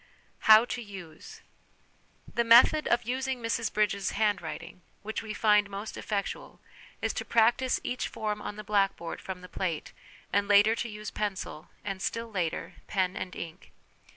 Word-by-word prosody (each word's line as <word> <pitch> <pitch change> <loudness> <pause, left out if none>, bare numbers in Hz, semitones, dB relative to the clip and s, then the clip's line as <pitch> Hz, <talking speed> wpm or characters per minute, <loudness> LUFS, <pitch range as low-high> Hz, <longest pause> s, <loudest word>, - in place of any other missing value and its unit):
How 220 +2 +10
to 245 0 -4
Use. 190 -7 -10 0.9
The 235 - +2
method 240 +7 +7
of 235 0 +2
using 260 +2 -2
Mrs 230 -1 -1
Bridges' 200 -2 0
Handwriting^ 205 -5 -2 0.2
which 220 +1 -3
we 220 - -6
find 210 -2 +3
most 200 +2 -6
effectual, 200 -2 -4 0.4
is - - +1
to - - -3
practise 235 +3 +3
each 250 - -2
form 210 -1 -3
on 210 - -5
the 215 - -7
blackboard 195 -5 0
from 185 -1 -6
the 180 - -10
plate, 175 -4 -3 0.4
and 200 0 +2
later 205 +2 +6
to 235 +1 -3
use 210 0 -7
pencil, 195 -6 -4 0.2
and 195 -2 -4
still 230 +3 -3
later 175 -5 -3
pen 185 -2 0
and 185 - -5
ink. 165 -1 -8
210 Hz, 155 wpm, -29 LUFS, 195-230 Hz, 0.9 s, How